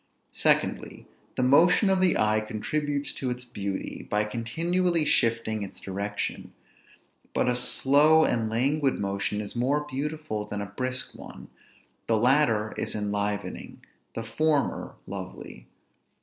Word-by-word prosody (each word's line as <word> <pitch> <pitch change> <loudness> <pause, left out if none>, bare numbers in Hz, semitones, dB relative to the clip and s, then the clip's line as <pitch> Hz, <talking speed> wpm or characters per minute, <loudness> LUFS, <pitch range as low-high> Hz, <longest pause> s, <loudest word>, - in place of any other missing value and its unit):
Secondly, - - 0 0.3
the 130 - 0
motion 165 - +5
of 190 -1 +2
the 185 -1 +3
eye 110 0 +3
contributes 145 +7 -2
to 130 - -3
its 125 0 -5
beauty, 100 -5 -5
by 105 0 +2
continually 165 +10 0
shifting 115 -4 +2
its 100 - -7
direction; 100 +2 -4 0.8
but - - +2
a 125 - +2
slow 145 +5 +4
and 115 -2 0
languid 135 +5 +1
motion 100 +1 -2
is 105 - -6
more 140 +5 0
beautiful 150 -5 -3
than 105 - -4
a 100 - -3
brisk 125 +5 -2
one; - - -11 0.6
the 115 - +3
latter 120 -3 +2
is - - -2
enlivening; 105 0 -3 0.3
the 115 - -3
former 145 +6 0
lovely. - - -8
120 Hz, 130 wpm, -27 LUFS, 105-150 Hz, 0.8 s, motion